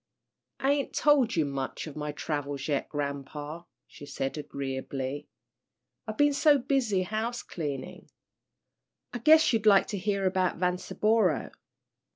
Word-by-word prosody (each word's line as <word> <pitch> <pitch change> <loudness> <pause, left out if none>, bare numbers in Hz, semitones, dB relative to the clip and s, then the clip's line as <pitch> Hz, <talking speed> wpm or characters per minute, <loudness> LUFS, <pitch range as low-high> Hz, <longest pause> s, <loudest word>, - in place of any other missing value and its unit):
"I 270 - +2
ain't 285 -2 -1
told 280 -6 +3
you 160 -3 +2
much 135 -2 -4
of 155 - -9
my 150 -1 -3
travels 145 -2 -4
yet, 145 -3 -1
grampa," 145 +3 -5 0.2
she 145 - -13
said, 135 -1 -3
agreeably. 135 -1 -4 0.8
"I've 215 0 -5
been 290 0 +4
so 290 +1 +5
busy 245 -7 +1
house 220 +5 -3
cleanin'. 145 -6 -6 1.1
I 245 - -3
guess 310 +3 +6
you'd 220 -1 +1
like 200 -2 +6
to 205 - -3
hear 200 0 -1
about 185 -1 +1
Vanceboro." 180 0 +1
180 Hz, 135 wpm, -28 LUFS, 145-225 Hz, 1.1 s, guess